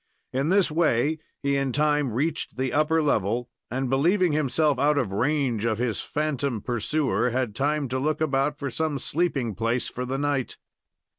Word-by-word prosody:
In 135 +4 0
this 190 -3 +3
way 155 -1 +2 0.2
he 140 0 +1
in 135 -1 0
time 150 -1 +1
reached 150 +7 -2
the 130 -1 -1
upper 155 +2 +2
level, 120 -2 0 0.2
and, 130 +2 -2
believing 170 +8 +3
himself 150 -1 +1
out 145 +1 +3
of 125 -8 0
range 125 0 0
of 110 -2 +1
his 120 -2 -1
phantom 140 -5 -1
pursuer, 125 +4 0
had 125 -3 -1
time 145 +4 0
to 130 +1 -1
look 155 +3 0
about 145 -1 +1
for 140 -2 -4
some 155 0 -1
sleeping 135 -7 -1
place 115 +3 -1
for 125 - -5
the 130 +2 -2
night. 140 -2 -1
140 Hz, 170 wpm, -25 LUFS, 125-150 Hz, 0.2 s, this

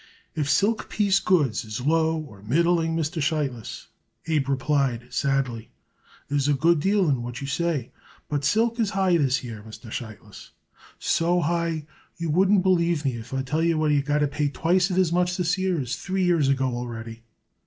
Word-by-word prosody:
"If 150 -2 -2
silk 215 +6 +1
piece 205 -2 +2
goods 145 -12 +1
is 110 0 -5
low 160 +4 +2
or 120 -11 -9
middling, 165 +7 +1
Mr. 160 +1 -2
Sheitlis," 145 -7 -2 0.4
Abe 150 -4 0
replied 130 -3 0
sadly, 130 -5 -1 0.6
"there 145 0 0
is 140 - 0
a 145 - +3
good 165 +4 +3
deal 195 +2 +2
in 135 -5 +1
what 120 +1 -6
you 140 - -5
say. 145 -3 -1 0.4
But 145 -1 -2
silk 230 - +1
is 220 -3 +2
high 185 -3 +3
this 135 -4 +1
year, 115 -4 -7
Mr. 110 +1 -11
Sheitlis, 110 -3 -9 0.4
so 175 +2 +1
high 165 -1 -1 0.3
you 165 -2 -2
wouldn't 190 +3 +4
believe 170 -5 +2
me 130 -3 0
if 115 +1 -10
I 135 0 -1
tell 150 +5 -1
you 165 -1 +2
we 150 -2 +2
got 145 +1 0
to - - 0
pay 145 +1 -1
twicet 175 +6 +1
as 180 -3 +2
much 180 0 +1
this 180 -1 +1
year 185 -3 0
as 125 -3 -2
three 190 0 -2
years 170 -6 +3
ago 135 -1 +1
already." 115 -1 -6
150 Hz, 185 wpm, -25 LUFS, 130-175 Hz, 0.6 s, wouldn't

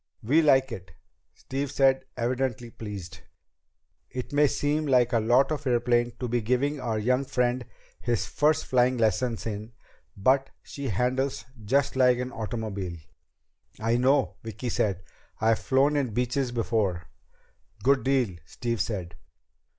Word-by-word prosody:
"We 145 +9 +4
like 135 -4 +4
it," 90 -7 -8 0.4
Steve 140 +1 -4
said, 135 -1 +3
evidently 120 -1 -1
pleased. 100 -6 -8 0.9
"It 125 +2 -6
may 145 +1 +5
seem 150 +2 0
like 125 -2 +3
a 115 - +4
lot 125 +6 +3
of 145 -2 -3
airplane 120 -1 +2
to 125 - -2
be 120 0 0
giving 130 +6 0
our 115 -4 -2
young 125 +5 +1
friend 125 -1 0 0.4
his 120 -2 -1
first 150 +1 +1
flying 125 0 +2
lessons 115 +1 0
in, 110 +1 -5 0.4
but 135 +7 +3
she 140 -1 -6
handles 125 +5 -1 0.2
just 135 +7 +1
like 125 -1 +4
an 125 +1 -3
automobile." 105 -6 -4 0.8
"I 115 +2 +1
know," 135 +2 +2
Vicki 115 +2 -5
said. 95 -4 0 0.4
"I've 110 0 +3
flown 140 +3 +2
in 130 -7 -1
Beeches 125 +1 0
before." 110 -7 0 0.8
"Good 135 +2 +3
deal," 130 -9 +1
Steve 115 +7 -3
said. 90 -6 -3
125 Hz, 140 wpm, -27 LUFS, 110-135 Hz, 0.9 s, may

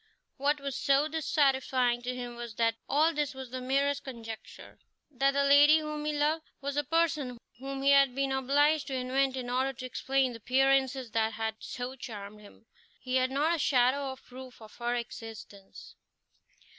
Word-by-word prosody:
What 290 +2 +1
was 275 -2 -4
so 280 +1 +2
dissatisfying 265 -5 +1
to 250 +1 -4
him 245 -1 -6
was 235 -2 -7
that 230 0 +2 0.2
all 315 +4 +3
this 295 -2 -2
was 260 -2 -8
the 255 0 -5
merest 275 +2 0
conjecture, 230 -4 -9 0.3
that 275 0 +2
the 280 0 +1
lady 290 +2 +7
whom 305 -1 -4
he 305 - 0
loved 300 +2 +1 0.2
was 280 0 -4
a 295 - +1
person 305 -5 0 0.2
whom 270 +1 -5
he 280 - +5
had 275 -2 +5
been 275 0 0
obliged 285 +3 +2
to 270 - -3
invent 260 +1 0
in 250 -1 -4
order 260 +2 0
to 255 0 -8
explain 265 +1 0
the - - -7
appearances 265 0 +1
that 220 0 0
had 220 0 -3
so 250 +1 -6
charmed 210 -4 -9
him. 210 +2 -17 0.3
He 255 0 -1
had 255 0 +2
not 295 +5 +1
a 335 - -1
shadow 265 +1 +2
of 265 - -12
proof 255 0 -11
of 220 -1 -14
her 240 0 -1
existence. 225 -4 -9
265 Hz, 180 wpm, -30 LUFS, 245-280 Hz, 0.3 s, lady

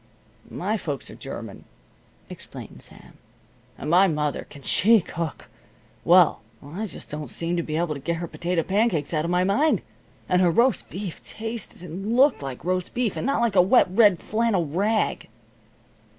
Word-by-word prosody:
"My 210 +5 -2
folks 145 - -5
are - - -10
German," - - -8 0.6
explained - - -9
Sam. - - -11 0.6
"And 150 - -4
my 185 +3 +6
mother 150 -4 -2
can 140 -2 -13
she 225 +3 +5
cook! 165 -3 -5 0.6
Well, - - +5 0.2
I 185 +10 -5
just 170 - -8
don't 150 -3 -5
seem 170 +5 -1
able 155 +1 0
to 140 - -7
get 170 +5 -2
her 170 +1 -4
potato 170 0 -1
pancakes 190 -7 0
out 155 0 0
of - - -2
my 180 +1 +2
mind. 215 +12 +2 0.4
And 180 0 +3
her 180 - +4
roast 240 +9 +2
beef 190 -3 -6
tasted 225 -4 -7
and 195 +7 -4
looked 275 - +4
like 135 +1 -7
roast 185 0 -1
beef, 240 -4 0
and - - -2
not 275 -3 +1
like 230 -4 +1
a 180 - +8
wet 195 +5 +4
red 205 -2 +5
flannel 215 -5 +1
rag." 200 +9 0
180 Hz, 165 wpm, -24 LUFS, 165-220 Hz, 0.6 s, a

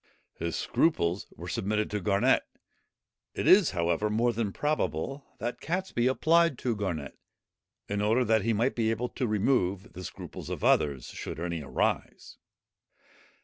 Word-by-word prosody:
His 85 -1 -3
scruples 90 - +1
were - - -8
submitted 105 +2 -1
to 105 - -1
Garnet. 100 +2 +3 0.9
It - - -2
is, 190 -2 +7
however, 85 +3 0
more 115 +3 +2
than 110 -3 -1
probable, 135 - -1
that 120 +3 -4
Catesby 175 -8 -1
applied 165 +2 +3
to 120 -3 -1
Garnet, 85 -9 -4 0.7
in 100 0 -1
order 115 +4 +2
that 110 -1 +3
he 115 - +1
might 115 +4 +1
be 115 -2 0
able 115 +2 -1
to 125 - -2
remove 105 -2 0
the 90 +2 -8
scruples - - -8
of - - -5
others, 70 -4 +2
should - - -6
any 85 -1 -3
arise. 70 - -2
105 Hz, 145 wpm, -29 LUFS, 90-125 Hz, 0.9 s, is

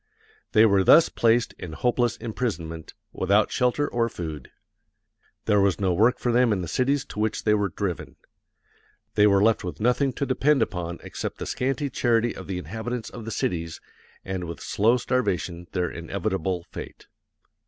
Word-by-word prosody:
They 110 0 +7
were 100 -3 +4
thus 165 - +7
placed 115 0 +2
in 85 -3 -7
hopeless 120 +3 0
imprisonment, 90 -9 -4 0.2
without 100 +3 +2
shelter 125 +4 +1
or 115 -1 0
food. 80 - -7 1.0
There 105 -2 +3
was 100 -1 +2
no 95 -3 +1
work 115 +8 +3
for 120 - -1
them 120 0 +3
in 95 -3 0
the - - -5
cities 135 - 0
to - - -8
which 110 0 -1
they 105 - +3
were 105 -2 +1
driven. 90 -1 -4 1.0
They 105 0 +5
were 100 -1 +4
left 115 0 +3
with 90 - -6
nothing 125 +5 +2
to 140 - -2
depend 135 0 +2
upon 85 -4 -4
except - - -5
the - - -5
scanty 135 +2 -2
charity 120 -1 +1
of - - -9
the 95 -2 -3
inhabitants 110 +7 -5
of 115 -3 -8
the - - -4
cities 85 -5 -2 0.5
and 95 -2 -3
with 85 0 -7
slow 115 +4 +2
starvation 95 -9 -1
their 90 -2 -1
inevitable 95 0 -3
fate.... - - -9
105 Hz, 170 wpm, -25 LUFS, 90-120 Hz, 1.0 s, They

